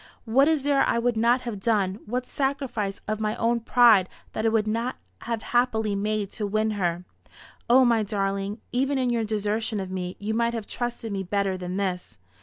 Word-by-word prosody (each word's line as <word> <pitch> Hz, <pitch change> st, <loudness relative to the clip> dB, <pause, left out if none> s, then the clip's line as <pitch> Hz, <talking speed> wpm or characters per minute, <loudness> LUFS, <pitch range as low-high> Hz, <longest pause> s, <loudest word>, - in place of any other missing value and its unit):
What 265 Hz, +5 st, +4 dB
is 315 Hz, -4 st, +2 dB
there 280 Hz, -1 st, +3 dB
I -, -, +1 dB
would 240 Hz, 0 st, +1 dB
not 235 Hz, +3 st, +3 dB
have 235 Hz, -5 st, -5 dB
done 200 Hz, -2 st, 0 dB
what 250 Hz, +3 st, -2 dB
sacrifice 255 Hz, -8 st, -2 dB
of 215 Hz, 0 st, -2 dB
my 215 Hz, 0 st, -1 dB
own 235 Hz, +1 st, +1 dB
pride 230 Hz, -5 st, +5 dB, 0.2 s
that 220 Hz, -, 0 dB
I -, -, +5 dB
would 220 Hz, -1 st, +1 dB
not 230 Hz, +4 st, -1 dB, 0.3 s
have 230 Hz, -2 st, -3 dB
happily 220 Hz, -4 st, +2 dB
made 205 Hz, 0 st, -1 dB
to 210 Hz, -3 st, -3 dB
win 215 Hz, +2 st, 0 dB
her! 180 Hz, -3 st, -1 dB, 0.6 s
O 255 Hz, +2 st, +7 dB
my 230 Hz, -2 st, +3 dB
darling, 200 Hz, 0 st, -2 dB
even 270 Hz, +3 st, +1 dB
in 255 Hz, -2 st, +1 dB
your 230 Hz, -1 st, +1 dB
desertion 215 Hz, 0 st, -1 dB
of 190 Hz, -1 st, -5 dB
me 180 Hz, -1 st, -4 dB
you 210 Hz, +2 st, -3 dB
might 235 Hz, +1 st, +1 dB
have 225 Hz, -2 st, -4 dB
trusted 240 Hz, -1 st, -4 dB
me 195 Hz, -1 st, -2 dB
better 195 Hz, 0 st, -1 dB
than 180 Hz, 0 st, -5 dB
this! 185 Hz, -3 st, -3 dB
220 Hz, 200 wpm, -25 LUFS, 200-240 Hz, 0.6 s, O